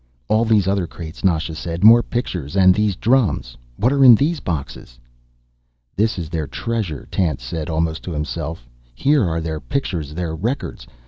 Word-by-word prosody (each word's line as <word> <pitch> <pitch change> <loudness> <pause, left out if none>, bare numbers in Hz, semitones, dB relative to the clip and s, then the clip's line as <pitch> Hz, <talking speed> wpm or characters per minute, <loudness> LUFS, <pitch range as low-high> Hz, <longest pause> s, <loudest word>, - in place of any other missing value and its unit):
"All 110 +2 +3
these 105 -4 +3
other 95 -3 0
crates," 80 -1 -9
Nasha 80 -4 +1
said. 85 +3 -5
"More 115 +2 +8
pictures. 90 - -4
And 95 -1 +6
these 105 -1 0
drums. 105 - +1 0.2
What 125 +6 +2
are 140 -1 +3
in 125 -3 +10
the 145 +9 +1
boxes?" 70 -6 -5 1.0
"This 110 +1 +1
is 85 -3 -4
their 80 -2 -3
treasure," 100 - -4
Tance 80 -10 -1
said, 80 +6 -5
almost 80 0 -1
to 90 - -5
himself. 75 -2 -5 0.3
"Here 145 - +2
are 80 0 -1
their 80 -1 -4
pictures, 75 - -3
their 85 -2 -3
records. 115 - -4
85 Hz, 170 wpm, -20 LUFS, 80-110 Hz, 1.0 s, in